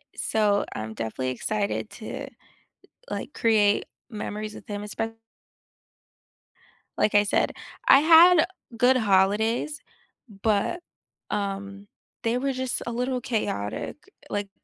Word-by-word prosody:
So 205 -2 +1
I'm 110 0 -5
definitely 115 +4 -3
excited 200 - -2
to - - -5 0.8
like - - -5
create 210 -3 +3 0.2
memories 215 -1 -5
with - - -12
him, 205 0 -4
espe 225 +2 -4 1.8
Like 210 - +2
I 205 - +7
said, 205 - +1 0.4
I 275 - +9
had 330 +2 +7 0.3
good 250 +3 +5
holidays, 220 +7 +2 0.6
but, 220 - +1 0.5
um, 200 0 -4 0.4
they 230 +1 +1
were 270 +1 -1
just 260 -1 -2
a - - -1
little 250 +1 -1
chaotic. 110 - -3 0.3
Like 205 -1 -3
215 Hz, 110 wpm, -26 LUFS, 200-250 Hz, 1.8 s, I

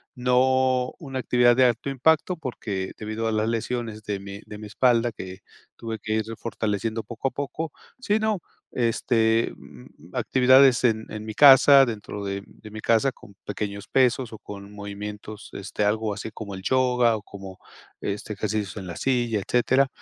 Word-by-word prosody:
no 130 0 +2
una 135 -5 -5
actividad 120 0 +4
de 130 - +6
alto 120 +2 0
impacto 160 +6 +2
porque 105 -10 -4
debido 110 +1 -3
a - - 0
las 110 0 0
lesiones 115 -1 -3
de 105 -1 -3
mi 100 +1 -9
de 105 - -9
mi 105 0 -8
espalda 120 +2 +2
que 95 -2 -8 0.4
tuve 115 -1 -5
que 110 - -2
ir 110 - +1
refortaleciendo 110 -1 -3
poco 120 +2 -4
a - - -22
poco, 145 +4 -4 0.3
sino, 215 -3 0 0.3
este, 115 -1 +1
mm, 75 +7 -16
actividades 130 0 +5
en 110 -2 +1
en 110 0 -6
mi 110 - -5
casa, 140 0 +8
dentro 105 -3 -6
de 100 0 -4
de 110 - -14
mi 110 - -7
casa 115 +5 +3
con 100 -5 -17
pequeños 100 0 -5
pesos 130 -2 +2
o 110 - -9
con 100 0 -10
movimientos 105 +1 -8
este 100 +1 -4
algo 110 +1 0
así 110 +2 -6
como 100 -3 -7
el 95 - -8
yoga 125 -1 +2
o - - -9
como 95 -2 -10 0.4
este 100 +1 -4
ejercicios 105 0 -3
en 95 -3 -6
la 85 - -6
silla, 120 -4 0
etcétera, 130 +3 +3
115 Hz, 170 wpm, -25 LUFS, 105-125 Hz, 0.4 s, casa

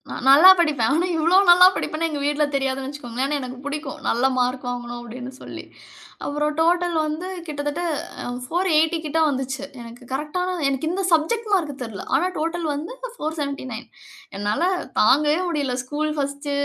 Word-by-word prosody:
நான் - - -6
நல்லா 300 +7 +9
படிப்பேன். 290 -8 +2
ஆனா 340 +4 +1
இவ்ளோ 330 +3 +2
நல்லா 355 +1 +9
படிப்பேன்னு 330 +2 -2
எங்க 295 -2 -4
வீட்ல 295 +1 +1
தெரியாதுன்னு 270 -1 -1
வச்சுக்கோங்களேன். 265 -3 -4
ஆனா 295 +1 0
எனக்கு 255 0 -7
பிடிக்கும். 285 -1 -5
நல்ல 235 +2 +1
மார்க் 250 +1 0
வாங்கணும் 240 -1 -5
அப்டின்னு 245 +2 -8
சொல்லி. - - -8 0.6
அப்பறம் 295 +1 -1
டோட்டல் 345 +1 +2
வந்து 310 +4 -4 0.2
கிட்டத்தட்ட 290 +2 -3 0.6
480 330 0 +2
கிட்ட 305 +2 0
வந்துச்சு. 270 -1 -3 0.2
எனக்கு 235 +1 -11
கரெக்ட்டான 360 +6 -2
எனக்கு 275 +3 -2
இந்த 385 +2 -2
சப்ஜெக்ட் 425 +8 +1
மார்க் 305 -8 0
தெரியல. 225 -5 -7
ஆனா 360 - +2
டோட்டல் 330 +1 -2
வந்து 320 +12 -6 0.2
479 280 -6 -4 0.5
என்னால 205 +9 -1 0.4
தாங்கவே 295 +8 +4
முடியல. 285 -6 -1
School 300 +3 -2
first. 280 0 -3
295 Hz, 150 wpm, -22 LUFS, 260-325 Hz, 0.6 s, நல்லா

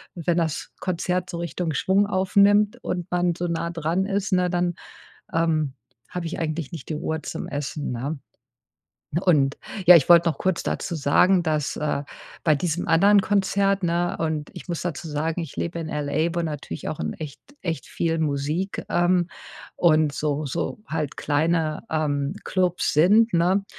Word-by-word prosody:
wenn 170 0 0
das 160 -3 -2
Konzert 180 0 -1
so 170 - -5
Richtung 170 -1 -3
Schwung 190 +7 +2
aufnimmt 205 +2 +3
und 175 -2 -3
man 175 -1 +2
so 175 0 -2
nah 170 0 -2
dran 170 +3 -1
ist, 200 0 -1
ne, 180 -1 +3
dann, 175 0 0 0.6
ähm, 155 -4 +1 0.3
habe 180 -1 -5
ich 165 - -4
eigentlich 155 -1 -3
nicht 160 -6 -8
die 155 - -2
Ruhe 160 +1 -2
zum - - -5
Essen, 145 -1 -4
ne? 135 +5 -3 1.0
Und 145 -7 +2 0.3
ja, 180 - +11
ich 145 - +2
wollte 170 -1 +7
noch - - -6
kurz 185 -2 0
dazu 175 - -3
sagen, 175 +5 +4
dass, 155 -3 -1
äh, 150 -2 -1 0.4
bei 155 -2 +5
diesem 170 +3 -2
anderen 200 +5 +6
Konzert, 195 0 +1
ne, 175 +2 0
und 155 -2 -2
ich - - -10
muss 170 - -2
dazu 170 -1 -4
sagen, 160 +3 -2
ich 160 - -8
lebe 170 0 -3
in 160 - -5
LA, 150 +3 -1
wo 170 - 0
natürlich 150 - -5
auch - - -4
in 75 -1 -2
echt 150 -3 -7 0.2
echt 165 -3 -3
viel 165 -1 -1
Musik, 155 +5 -1
ähm, 175 0 +2 0.5
und 155 -3 +4
so 150 0 -1
so 140 - -3
halt 155 -2 -3
kleine, 155 +1 0
ähm, 145 0 0
Klubs 180 -2 0
sind, 205 +8 +5
ne? 185 +4 +3
170 Hz, 170 wpm, -24 LUFS, 155-180 Hz, 1.0 s, ja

